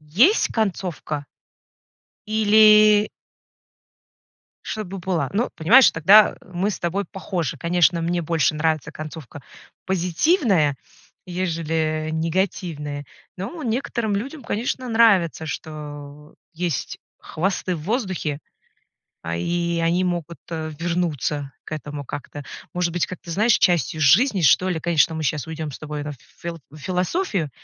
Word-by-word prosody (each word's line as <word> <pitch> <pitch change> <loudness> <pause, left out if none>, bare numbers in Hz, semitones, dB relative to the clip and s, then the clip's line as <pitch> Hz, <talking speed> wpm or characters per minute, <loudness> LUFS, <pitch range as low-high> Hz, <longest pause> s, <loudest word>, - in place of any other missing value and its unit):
есть 210 - +3
концовка 180 -8 -2 1.0
или 215 -1 +6 1.6
чтобы 195 -3 -5
была, 170 -6 -1
ну, 225 +5 0
понимаешь, 230 +11 +7
тогда, 200 +7 +6
э, - - -19
мы 185 +4 0
с - - -5
тобой 185 +4 -1
похожи. 180 -6 -4
Конечно, 175 0 +2
мне 175 +1 0
больше 155 -2 +1
нравится 155 -1 0
концовка 155 -3 -9 0.4
позитивная, 185 - +2 0.5
ежели 160 -3 -1
негативная, 160 -3 -2 0.3
но 310 - -6
некоторым 235 -3 -1
людям, 270 +8 -4
конечно, 250 +4 -2
нравится, 210 -9 +3
что 150 -1 -8 0.2
есть 170 -5 -3 0.2
хвосты 185 +1 -2
в 155 - -8
воздухе, 185 - -2 0.8
а, 85 0 -3
и 170 - -1
они 170 +2 +2
могут 170 -2 -3
вернуться 155 -3 -2
к - - -12
этому 145 -2 -6
как-то, 145 +2 -7 0.3
может 175 -1 0
быть, 175 0 +1
как-то, 185 -1 -10
знаешь, 215 +6 +3
частью 170 -3 +2
жизни, 190 - +4
что 180 +5 +4
ли. 165 -3 -1
Конечно, 165 -1 +2
мы 160 - -4
щас 150 -1 -1
уйдем 160 -1 -5
с - - -8
тобой 150 -1 -5
на 150 0 -5 0.3
фил 170 -1 -6
в 155 - -12
философию, 180 - -1
170 Hz, 125 wpm, -22 LUFS, 155-195 Hz, 1.6 s, понимаешь